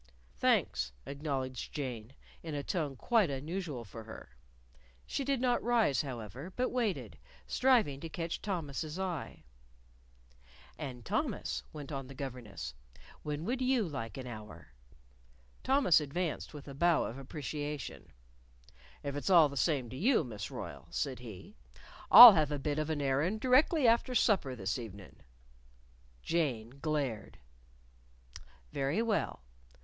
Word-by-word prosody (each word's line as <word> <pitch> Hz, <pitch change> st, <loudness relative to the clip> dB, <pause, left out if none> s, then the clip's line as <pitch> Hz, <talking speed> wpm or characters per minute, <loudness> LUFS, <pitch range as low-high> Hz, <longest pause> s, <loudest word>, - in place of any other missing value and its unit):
"Thanks," -, -, +1 dB
acknowledged 135 Hz, -3 st, -4 dB
Jane, 125 Hz, -5 st, -5 dB, 0.3 s
in 160 Hz, -3 st, -5 dB
a 145 Hz, -, -3 dB
tone 150 Hz, -7 st, -2 dB
quite 215 Hz, -, +2 dB
unusual 145 Hz, -2 st, -4 dB
for 110 Hz, +2 st, -10 dB
her. 110 Hz, -, -11 dB, 0.7 s
She 275 Hz, -, -2 dB
did 275 Hz, -1 st, 0 dB
not 245 Hz, -1 st, +1 dB
rise, 230 Hz, -, +2 dB
however, 130 Hz, -, -7 dB
but 255 Hz, +1 st, 0 dB
waited, 235 Hz, -6 st, -2 dB, 0.3 s
striving 235 Hz, -, +2 dB
to 165 Hz, -, -7 dB
catch 165 Hz, +1 st, -4 dB
Thomas's 160 Hz, -5 st, -4 dB
eye. 180 Hz, -6 st, -4 dB, 1.3 s
"And, 125 Hz, -6 st, -7 dB
Thomas," 65 Hz, -7 st, -2 dB
went 145 Hz, -1 st, -8 dB
on 135 Hz, -2 st, -4 dB
the 135 Hz, -, -11 dB
governess, 125 Hz, -, -6 dB, 0.5 s
"when 150 Hz, +2 st, -4 dB
would 250 Hz, +4 st, -1 dB
you 255 Hz, -5 st, +2 dB
like 135 Hz, -7 st, -6 dB
an 130 Hz, -, -6 dB
hour?" 105 Hz, -, -9 dB, 0.9 s
Thomas 265 Hz, -, +4 dB
advanced 155 Hz, +3 st, -3 dB
with 150 Hz, -2 st, -10 dB
a 140 Hz, -, -7 dB
bow 170 Hz, +3 st, +3 dB
of 125 Hz, -, -5 dB
appreciation. 145 Hz, +1 st, -6 dB, 0.9 s
"If 140 Hz, 0 st, -3 dB
it's 145 Hz, -, -2 dB
all 170 Hz, -5 st, +7 dB
the 140 Hz, -, -8 dB
same 140 Hz, -4 st, +1 dB
to -, -, -7 dB
you, 225 Hz, -, +3 dB
Miss 110 Hz, -6 st, -6 dB
Royle," -, -, -8 dB
said 135 Hz, -4 st, -2 dB
he, 110 Hz, -7 st, -10 dB, 0.6 s
"I'll 235 Hz, +1 st, +13 dB
have 155 Hz, -4 st, +1 dB
a 145 Hz, -, -1 dB
bit 145 Hz, +2 st, -2 dB
of 155 Hz, 0 st, -2 dB
an 155 Hz, -2 st, -1 dB
airin' 145 Hz, +10 st, +1 dB
directly 260 Hz, +4 st, +4 dB
after 235 Hz, +2 st, +3 dB
supper 185 Hz, -, +2 dB
this 95 Hz, -1 st, -2 dB
evenin'." 100 Hz, -4 st, -10 dB, 1.0 s
Jane 130 Hz, -9 st, -1 dB
glared. 140 Hz, -10 st, -2 dB, 1.3 s
"Very 140 Hz, +11 st, 0 dB
well." 215 Hz, -, -1 dB
145 Hz, 135 wpm, -32 LUFS, 130-185 Hz, 1.3 s, I'll